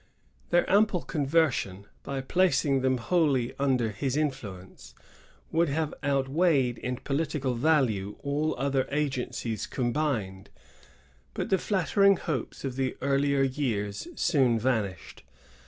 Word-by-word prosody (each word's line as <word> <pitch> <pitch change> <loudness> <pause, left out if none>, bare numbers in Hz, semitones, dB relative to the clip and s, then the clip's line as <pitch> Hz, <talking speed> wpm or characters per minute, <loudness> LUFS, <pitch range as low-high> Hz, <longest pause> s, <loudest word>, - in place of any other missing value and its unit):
Their 175 0 +3
simple 200 -3 +3
conversion, 140 - 0 0.2
by 140 -1 -4
placing 145 -3 +2
them 130 0 +2
wholly 135 -1 +1
under 130 -5 +1
his 130 +6 -2
influence, 110 -12 -5 0.6
would 165 0 +2
have 155 +1 -1
outweighed 140 -2 +1
in 125 0 -3
political 140 -2 -2
value 115 -8 +1
all 150 +2 0
other 135 0 0
agencies 130 -6 -2
combined; 120 -8 -2 0.9
but - - -3
the 190 - +4
flattering 200 0 +3
hopes 145 -9 -4
of 130 -1 -4
the 130 -1 -1
earlier 140 +1 +2
years 110 -7 -2
soon 130 -8 +2
vanished. 110 -6 -2
135 Hz, 115 wpm, -28 LUFS, 120-155 Hz, 0.9 s, the